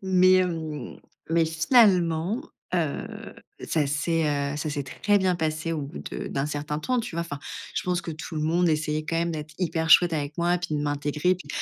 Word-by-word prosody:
mais, 185 -1 +5
hem, 160 -7 -1 0.3
mais 165 0 +3
finalement, 175 +2 +3 0.3
heu, - - -3 0.3
ça 155 -3 +1
s'est, 160 +3 0 0.3
heu, - - -4
ça 150 +1 -3
s'est 145 -1 -3
très 205 +10 +1
bien 185 -2 +2
passé 160 0 -2
au 155 -2 -2
bout 140 +3 -7
de - - -5
d'un 135 +1 -1
certain 150 0 -3
temps, 250 +8 0
tu 180 - -6
vois, 170 - 0
enfin, 145 -4 -6 0.3
je - - -1
pense 180 -1 0
que 170 - -6
tout 160 +1 -7
le 155 - -1
monde 170 +3 +2
essayait 155 -1 0
quand 165 - -2
même 170 0 0
d'être 155 -1 -6
hyper 165 -3 -1
chouette 175 +1 +7
avec 150 -1 -3
moi, 175 +1 +2
puis 175 -3 -3
de - - -1
m'intégrer 150 +4 0
puis, 185 - -12
160 Hz, 205 wpm, -26 LUFS, 150-180 Hz, 0.3 s, chouette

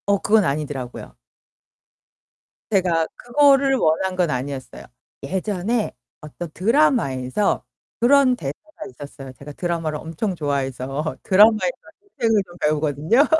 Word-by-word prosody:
어 200 0 +3
그건 215 0 +3
아니더라고요. 140 -4 -4 1.5
제가 175 -5 +2
그거를 275 +1 +4
원한 185 -2 +1
건 180 -3 +1
아니었어요. 130 -1 -5 0.4
예전에 200 - -1 0.3
어떤 155 +3 -8
드라마에서 205 - +1 0.4
그런 255 +1 +5
대사가 160 - -8
있었어요. 135 0 -10
제가 140 +3 -11
드라마를 165 -2 -2
엄청 165 +6 -4
좋아해서 140 0 -3
드라마에서 215 - +5 0.5
인생을 225 -3 +2
좀 175 -1 -15
배우거든요. 155 - +2
170 Hz, 300 characters per minute, -22 LUFS, 145-220 Hz, 1.5 s, 그런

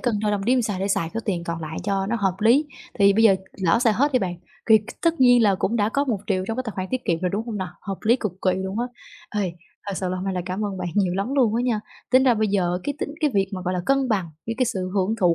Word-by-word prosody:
cân 235 -5 0
đo 210 -1 +1
đong 200 -1 -1
đếm 250 +1 +3
sao 205 -4 -2
để 195 - -1
xài 170 -4 0
số 225 - -1
tiền 175 -5 -2
còn 165 -1 -4
lại 160 0 -6
cho 195 -1 0
nó 235 +3 0
hợp 195 -4 0
lý. 255 +8 +4 0.3
Thì 200 0 +6
bây 225 +2 +3
giờ 195 -3 +7 0.3
lỡ 180 +6 +4
xài 235 -3 +3
hết 280 +7 +1
đi 255 - +4
bạn, 180 -4 -2 0.4
thì 220 -1 +8 0.2
tất 335 -3 +1
nhiên 245 -2 +6
là 200 -3 +4
cũng 205 +4 -1
đã 210 -2 +2
có 280 +5 0
1.000.000 195 -6 -1
trong 225 - -2
cái 255 - -1
tài 220 - -3
khoản 185 0 -2
tiết 255 -1 -2
kiệm 165 -1 0
rồi, 180 -1 0
đúng 220 +4 -3
hông 220 -3 -4
nà? 190 -2 -3
Hợp 195 -1 -5
lý 235 +3 +5
cực 210 -7 -3
kỳ 185 - +3
luôn 190 +1 -4
á. 245 - 0 0.6
Ê, 180 -3 -2 0.3
thật 200 - -3
sự 185 - -2
là 185 - -2
hôm 185 - -4
nay 190 -1 -2
là 180 - -1
cảm 190 +3 -2
ơn 195 -2 -4
bạn 180 - -3
nhiều 190 -4 +2
lắm 220 +8 -2
luôn 235 -6 +3
á 240 - +1
nha, 230 -4 0 0.3
tính 260 +1 +6
ra 245 -3 +5
bây 215 -1 +1
giờ 180 -3 +1
cái 285 - -2
tính 290 - -4
cái 300 -2 +2
việc 195 -1 +3
mà, 185 - -4
gọi 185 0 -1
là, 180 - -1
cân 275 -1 +2
bằng 190 -6 0 0.2
với 230 - -2
cái 255 - +3
sự 185 -5 -2
hưởng 195 +2 +1
thụ 175 -2 +4
205 Hz, 315 wpm, -23 LUFS, 185-235 Hz, 0.6 s, thì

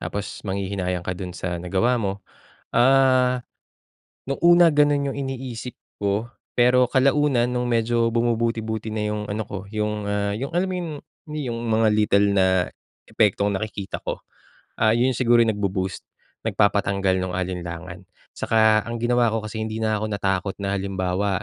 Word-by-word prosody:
Tapos 100 -1 -5
manghihinayang 95 -2 -2
ka 90 - -2
do'n 90 -1 -7
sa 90 -1 -3
nagawa 115 +7 +1
mo. 100 -1 -3 0.5
Ah, 130 -1 +4 0.9
no'ng 135 - -1
una 175 0 +7
gano'n 145 -2 +2
'yong 140 - -6
iniisip 130 -3 -5 0.2
ko 105 +3 -1 0.2
pero 125 +1 +4
kalaunan 135 -2 +3
no'ng 125 0 -1
medyo 115 0 +2
bumubuti-buti 115 -2 -1
na 110 - -1
'yong 105 0 -3
ano 110 +2 -2
ko, 100 - -5
'yong, 105 0 -1
ah, 100 0 -1
'yong 135 +6 -4
alam 180 +2 +2
mo 185 - -2
'yong, 165 -3 -4 0.4
ni 150 -3 -4
yong 115 - -3
mga 110 0 +3
little 105 -1 +3
na 95 -2 +3 0.4
epektong 105 -1 +2
nakikita 100 0 -4
ko. - - -3 0.6
Ah, 110 0 +4
'yon 125 +2 +3
siguro 120 -2 +4
'yong 115 - +2
nagbu-boost, 95 -2 -2 0.4
nagpapatanggal 100 -2 +2
no'ng 90 -1 -3
alinlangan. 90 0 -5 0.3
Saka 110 -1 +3
ang 115 0 -4
ginawa 120 -1 +3
ko 115 - -1
kasi 110 +1 -5
hindi 110 0 -4
na 110 -1 +1
ako 110 - -1
natakot 95 -1 -1
na, 100 0 -1
halimbawa, 95 0 -1
110 Hz, 155 wpm, -23 LUFS, 100-125 Hz, 0.9 s, una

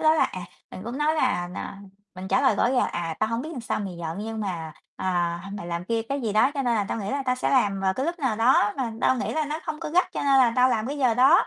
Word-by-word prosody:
đó 315 0 +5
là, - - +4
à, 185 - -4 0.3
mình 185 - -8
cũng 240 +4 -5
nói 305 +1 +2
là, 215 - +1
à, 195 - -6 0.4
mình 185 +1 -7
trả - - +3
lời 205 - +4
rõ - - +3
là: 255 -1 +2
"À, 165 -2 -3
tao 215 - +2
hông 230 +2 -2
biết 315 - -6
sao 230 - -2
mày 190 -4 -5
giận, 165 +2 -4
nhưng 225 0 -4
mà, 170 -6 -4 0.2
à, 175 -2 -1
h 200 +1 -7
mày 170 - -7
làm 170 0 -3
kia, 230 +2 -1
cái 275 +5 -3
gì 220 -4 -2
đó, 215 +6 +4
cho 275 - -1
nên 240 -2 +1
là 210 -3 +1
tao - - -2
nghĩ 200 - -3
là 280 +1 -1
tao 255 - +2
sẽ 255 - -1
làm 205 -7 +2
vào 190 0 +1
cái 265 +7 -2
lúc 345 +1 -2
nào 260 -7 0
đó 225 -2 +4
mà 240 -4 -2
tao 260 - +3
nghĩ - - -2
là 310 -1 0
nó 300 +2 -4
không 310 -1 -4
có 315 - -4
gắt, 360 +3 +2
cho - - -3
nên 275 -1 +4
là 245 -3 +5
tao 250 +1 +5
làm 220 -3 0
cái 285 +2 -4
giờ 250 -4 +3
đó. 265 +8 +5
230 Hz, 315 wpm, -25 LUFS, 195-275 Hz, 0.4 s, đó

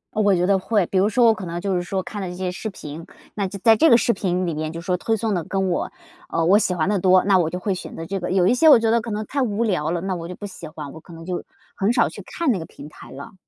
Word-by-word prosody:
我 205 -3 +3
觉 175 +1 +1
得 195 0 +3
会， 200 -1 +1
比 195 - -1
如 205 +3 +3
说 240 +2 +3
我 225 - +6
可 190 -4 -7
能 170 +1 -4
就 195 0 -1
是 175 - 0
说 190 +1 -3
看 205 +1 -6
了 185 - -4
这 180 - -7
些 185 -1 -3
视 220 +4 -5
频， 160 -4 -9 0.3
那 200 -2 -2
就 200 +2 -7
在 225 -1 +7
这 320 +8 +4
个 235 - +7
视 235 - +2
频 185 -2 -1
里 170 - -2
面 155 +1 -3
就 165 - -7
是 170 - -11
说 180 - +1
推 225 +5 -1
送 220 0 -1
的 175 -4 -1
跟 190 +2 -1
我 175 - -2 0.4
呃， 165 - 0
我 200 +4 +5
喜 180 - 0
欢 165 0 0
的 205 -2 +1
多， 185 0 +4
那 195 -2 +4
我 165 -2 +1
就 180 - -4
会 195 +1 -1
选 180 - -8
择 165 - -6
这 195 +3 -3
个， 175 - -4
有 185 -2 +3
一 - - +4
些 315 +6 +5
我 290 - +9
觉 225 0 +1
得 230 0 +3
可 230 - -7
能 210 +1 -3
太 275 +5 -2
无 225 -2 0
聊 180 -8 0
了， 170 0 -2
那 190 0 -2
我 170 -1 -6
就 180 - -7
不 205 - -8
喜 175 -4 -9
欢， 150 -2 -8
我 160 - -10
可 170 - -15
能 165 0 -10
就 180 0 -4 0.3
很 200 +4 +1
少 240 - +3
去 - - -10
看 335 -6 -1
那 190 - -1
个 160 - -6
平 150 - -12
台 - - -14
了。 140 +1 -10
190 Hz, 360 characters per minute, -22 LUFS, 175-215 Hz, 0.4 s, 我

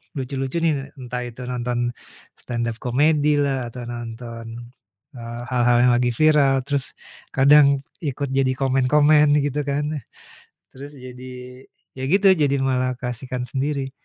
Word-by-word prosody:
lucu-lucu 135 0 -4
nih 165 - +4 0.3
entah 125 -1 -5
itu 120 +1 -10
nonton, 120 0 -1 0.5
stand-up 120 -1 -3
comedy 145 +4 +2 0.2
lah 135 -3 -1
atau 120 +1 -8
nonton, 115 0 -7 0.7
eee, 120 0 -7
hal-hal 120 -1 +3
yang 125 - +5
lagi 125 0 +2
viral 150 -2 +4
terus, 140 0 -3 0.4
kadang 145 +2 +7 0.3
ikut 140 -3 -3
jadi 135 -1 +2
komen-komen 145 +3 +4
gitu 145 0 -1
kan, 140 +1 0 0.9
terus 140 +2 -11
jadi, 125 -1 -10 0.7
ya 130 - -8
gitu 195 +5 +3
jadi 145 -6 +2
malah 130 -1 0
keasikan 125 +1 -4
sendiri. 135 +1 -2
130 Hz, 130 wpm, -22 LUFS, 125-145 Hz, 0.9 s, kadang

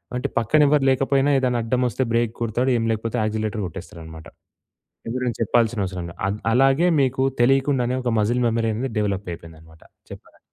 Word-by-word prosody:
అంటే 125 - -1
పక్కన 120 +7 +2
ఎవ్వరు 145 -1 +3
లేకపోయినా 135 +1 +2
ఏదైనా 125 -2 0
అడ్డమొస్తే 125 +2 0
బ్రేక్ 115 -1 +1
కొడతాడు, 120 +3 0
ఏం 115 - -1
లేకపోతే 115 +2 -3
యాక్సిలేటర్ 110 0 -2
గొట్టేస్తాడనమాట. 80 -3 -10 0.8
ఎవ్వరేం 125 0 -2
చెప్పాల్సిన 115 0 +1
అవసరంలా. 90 -2 -6
అ - - 0 0.2
అలాగే 135 +7 +3
మీకు 130 0 0 0.2
తెలియకుండానే 130 -1 +2
ఒక 125 - 0
మజిల్ 120 +4 +1
మెమరీ 115 0 0
అనేది 130 +4 -3
డెవలపయిపోయిందనమాట 85 -6 -5 0.3
చెప్పాలంటే. - - -13
115 Hz, 145 wpm, -22 LUFS, 105-130 Hz, 0.8 s, ఎవ్వరు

